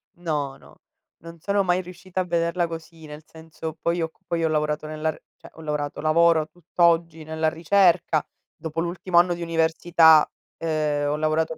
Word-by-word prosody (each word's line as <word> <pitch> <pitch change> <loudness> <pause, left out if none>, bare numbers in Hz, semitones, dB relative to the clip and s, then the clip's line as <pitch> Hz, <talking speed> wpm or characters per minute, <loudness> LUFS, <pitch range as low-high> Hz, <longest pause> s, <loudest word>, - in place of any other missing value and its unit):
No, 150 -6 -3
no, - - -20 0.4
non 165 0 -11
sono 200 +4 0
mai 180 0 +1
riuscita 185 +1 -5
a - - 0
vederla 170 0 0
così, 165 -1 -9
nel 150 +1 -10
senso: 160 0 -9
poi 170 +1 -1
ho 160 - -1
c - - -37
poi 170 -1 -2
ho - - +3
lavorato 150 0 -1
nella 155 +1 -2
r - - -15 0.2
cioè, - - -15
ho 160 - -13
lavorato 150 -2 -3
lavoro 160 0 +3
tutt'oggi 170 -1 0
nella 160 0 -1
ricerca, 170 -1 +2 0.3
dopo 160 0 -5
l'ultimo 175 +1 +1
anno 175 0 +3
di 170 - -6
università, 165 -1 +4 0.3
ehm, 150 -3 -1
ho - - 0
lavorato. 155 +1 0
165 Hz, 175 wpm, -24 LUFS, 155-170 Hz, 0.4 s, università